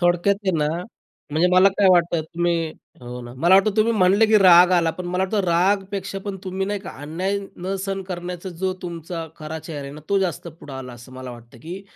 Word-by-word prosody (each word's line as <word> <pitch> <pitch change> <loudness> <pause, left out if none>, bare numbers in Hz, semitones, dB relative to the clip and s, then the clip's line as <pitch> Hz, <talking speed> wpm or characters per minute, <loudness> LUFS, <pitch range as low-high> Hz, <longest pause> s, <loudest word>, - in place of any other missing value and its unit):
थोडक्यात 175 +3 +3
आहे 190 - +2
ना, 150 0 +1 0.6
म्हणजे 160 +4 +2
मला 185 +2 +7
काय 200 - +5
वाटतं 170 -2 +3
तुम्ही 170 +2 -1 0.4
हो 125 0 -7
ना, 120 0 -9
मला 170 +8 +4
वाटतं 195 +2 +5
तुम्ही 220 +2 +3
म्हटले 200 +2 +4
की 215 0 +5
राग 180 -2 +7
आला, 170 -2 +3
पण 180 +3 -7
मला 180 +1 -1
वाटतं 200 +2 0
रागपेक्षा 195 +3 0
पण 200 -2 -4
तुम्ही 190 +1 -2
नाही 205 0 -2
का 190 - -8
अन्याय 185 +7 -2 0.2
न 185 +2 -3
सहन 195 -1 -3
करण्याचा 180 0 -5
जो 185 +1 -2
तुमचा 170 -1 -6
खरा 155 +1 -6
चेहरा 160 -2 -7
आहे 140 0 -8
ना, 150 - -10
तो 200 - +3
जास्त 180 -4 -2
पुढं 160 -3 -12
आला 130 -2 -7
असं 120 +2 -13
मला 130 0 -8
वाटतं, 120 -1 -13
की 175 +10 -8
175 Hz, 215 wpm, -22 LUFS, 160-195 Hz, 0.6 s, मला